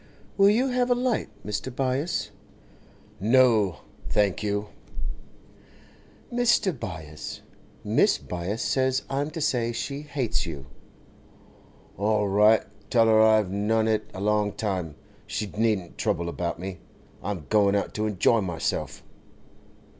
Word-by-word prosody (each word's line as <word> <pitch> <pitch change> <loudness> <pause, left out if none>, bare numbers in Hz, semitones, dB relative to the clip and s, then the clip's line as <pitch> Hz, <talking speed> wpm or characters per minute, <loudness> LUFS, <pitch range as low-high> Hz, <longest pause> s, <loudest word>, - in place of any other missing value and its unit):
'Will 200 0 +6
you 245 +6 +2
have 250 0 +1
a 245 - +4
light, 245 -1 0 0.2
Mr. 105 +5 -3
Byass?' 135 +6 -1 0.9
'No—thank 105 - +2
you.' 105 0 -2 1.6
'Mr. 230 -5 +3
Byass, 80 - -7 0.4
Mrs. - - +2
Byass 90 +5 -3
says 130 0 +1
I'm 140 +2 -1
to 165 +1 -6
say 125 -6 +1
she 140 +4 -4
hates 140 -5 -2
you.' 75 -7 -6 1.3
'All 105 0 +2
right. 105 +3 +5 0.3
Tell 115 -2 +4
her 110 -1 +5
I've 110 -3 +4
known 110 +3 +1
it 110 -1 0
a 95 - -7
long 105 0 +1
time. 95 -8 -3 0.3
She 105 - -2
needn't 105 -5 0
trouble 85 0 0
about 85 0 -3
me; 95 0 -6 0.4
I'm 95 -8 -4
going 100 -2 +4
out 100 - -1
to 110 0 -1
enjoy 105 +2 +3
myself. 85 -4 -3
110 Hz, 125 wpm, -26 LUFS, 100-130 Hz, 1.6 s, Will